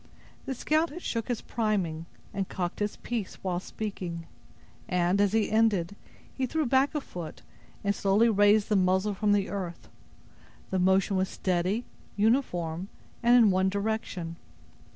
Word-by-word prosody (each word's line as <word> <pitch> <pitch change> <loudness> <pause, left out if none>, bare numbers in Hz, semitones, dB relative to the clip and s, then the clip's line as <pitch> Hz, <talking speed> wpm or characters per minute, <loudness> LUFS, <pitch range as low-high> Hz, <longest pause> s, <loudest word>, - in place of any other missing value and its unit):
The 265 - -2
scout 310 +6 +1
had 345 +4 -9
shook 230 -2 -2
his 245 -3 -2
priming, 185 -8 -1 0.3
and 195 -1 -2
cocked 175 -2 -3
his 205 0 -1
piece, 230 -5 -4
while 180 -2 -1
speaking; 180 -5 -5 0.6
and, 180 +1 +2
as 205 -2 +3
he 220 -1 +1
ended, 205 -5 +2 0.4
he 260 -1 -1
threw 315 +3 0
back 270 +4 +2
a 300 - 0
foot, 170 - -8 0.4
and 200 0 +2
slowly 200 +3 +3
raised 205 -1 +4
the 210 - +3
muzzle 190 +2 +2
from 205 +1 +1
the 200 -1 +2
earth: 185 -4 -5 0.8
the 190 - +1
motion 190 +2 +3
was 185 0 +1
steady, 185 +5 -1 0.3
uniform, 190 -7 +1 0.3
and 240 +1 +6
in 225 -4 +6
one 190 +1 +2
direction. 200 -5 -3
200 Hz, 150 wpm, -28 LUFS, 185-225 Hz, 0.8 s, and